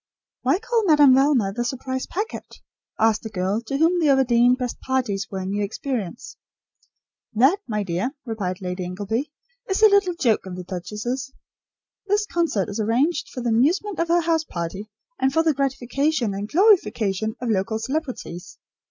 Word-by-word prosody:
"Why - - +2
call 455 +2 0
Madame 295 -4 +7
Velma 260 -7 +3
the 240 - -2
`surprise 260 +1 -3
packet'?" 420 +5 -5 0.4
asked 220 -1 +3
a 220 - -5
girl, 195 +2 -1
to 275 - -1
whom 335 +4 +3
the 320 - +2
Overdene 250 -2 +4
"best 250 -2 -4
parties" 225 -7 -1
were 195 - -5
a 190 - -4
new 200 +2 -1
experience. 225 0 -5 1.0
"That, 270 - +4
my 210 -3 -1
dear," 195 - -2
replied 200 -5 -4
Lady 180 0 -4
Ingleby, 205 +10 -3 0.4
"is 385 +3 0
a 435 - +9
little 400 -3 +3
joke 230 - +1
of 180 - -6
the 180 - -6
duchess's. 215 +9 -5 0.8
This 415 +1 +2
concert 335 - 0
is 205 - -5
arranged 245 +10 +1
for 250 - -6
the 240 - -1
amusement 335 - +1
of 335 - +1
her 345 +1 +3
house 325 -1 +1
party, 190 - -5 0.3
and 265 - +2
for 325 +4 +2
the 320 -2 +3
gratification 270 -2 0
and 200 +2 -5
glorification 220 - +2
of 245 -2 -1
local 215 +2 0
celebrities. 255 - -5
245 Hz, 170 wpm, -23 LUFS, 205-310 Hz, 1.0 s, a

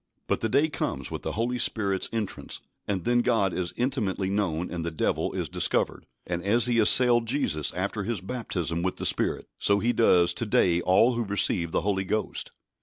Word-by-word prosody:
But - - 0
the 110 - 0
day 140 +7 +3
comes 150 - -3
with - - -5
the - - -4
Holy 120 +3 -1
Spirit's 100 -5 +1
entrance, 110 -3 -4 0.3
and 95 -4 -1
then 120 0 +2
God 100 -6 +1
is 90 -2 -2
intimately 110 -7 -1
known 90 -4 -1
and 85 -2 -4
the 85 - -2
Devil 80 - -1
is - - -2
discovered. - - -1 0.2
And 85 -1 -3
as 110 +5 +3
he 120 -2 +2
assailed 120 +1 +5
Jesus 110 - 0
after 100 +4 -2
His 110 +1 -3
baptism 90 - -3
with 95 +1 -1
the - - -5
Spirit, - - 0
so 100 - +3
he 120 +4 +1
does 90 -7 +4
to 115 - -3
day 90 -4 +3
all 100 +8 +4
who 120 0 -1
receive 100 -4 +1
the - - +1
Holy 95 -1 0
Ghost. 110 +3 -3
100 Hz, 195 wpm, -26 LUFS, 90-120 Hz, 0.3 s, assailed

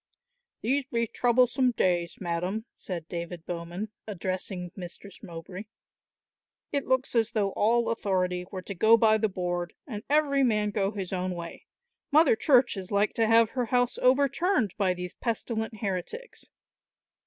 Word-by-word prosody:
"These 270 +4 +1
be 235 -3 0
troublesome 250 +2 +2
days, 175 -5 0
madam," 180 +5 -2
said 170 -4 -6
David 170 -1 -6
Bowman, 175 +4 -5 0.2
addressing 185 -2 -4
Mistress 185 +1 -9
Mowbray. 180 +4 -8 1.1
"It 280 -2 -1
looks 260 0 +1
as 230 -2 +1
though 200 -3 +1
all 230 +4 +2
authority 180 -5 -1
were 185 -2 -6
to 200 - -5
go 220 +5 +5
by 220 -1 +4
the 220 0 +1
board 175 -2 -3
and 210 -6 -6
every 290 -2 +3
man 210 -5 +2
go 200 -2 0
his 195 -3 -5
own 185 0 -2
way. 170 -1 -8 0.4
Mother 300 -4 +6
Church 245 -2 +4
is 185 -1 -7
like 205 +1 +2
to 225 -1 +2
have 225 0 +5
her 250 -2 -1
house 245 +1 +1
overturned 275 - +2
by 190 -3 +1
these 180 0 -6
pestilent 220 -2 -3
heretics." 205 - -5
210 Hz, 150 wpm, -28 LUFS, 180-240 Hz, 1.1 s, Mother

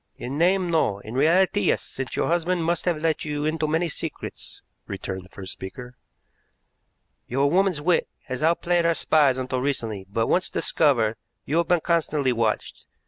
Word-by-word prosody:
"In 130 +3 -5
name, 180 +2 +2
no; 155 -11 +2
in 110 +2 -9
reality, 180 +9 +3
yes; - - +2
since 135 -1 -5
your - - +1
husband 175 +1 +1
must 170 0 0
have 175 -3 +1
let 160 -1 0
you 150 -1 -3
into 155 0 0
many 160 +3 +1
secrets," 160 - -6 0.2
returned 95 -1 -5
the - - -18
first 95 -1 -8
speaker. 125 +6 -8 1.3
"Your 140 +3 +1
woman's 185 -3 +2
wit 175 +2 +2 0.2
has 130 -1 -5
outplayed 170 +2 +2
our 170 0 +2
spies 145 -6 +3
until 130 0 -2
recently, 115 -8 -2
but, 115 +3 0
once 185 +8 +1
discovered, 115 -8 +2 0.3
you 150 - 0
have 170 - +1
been 175 -2 +3
constantly 155 -6 +1
watched. 115 -2 -2
150 Hz, 170 wpm, -24 LUFS, 125-170 Hz, 1.3 s, reality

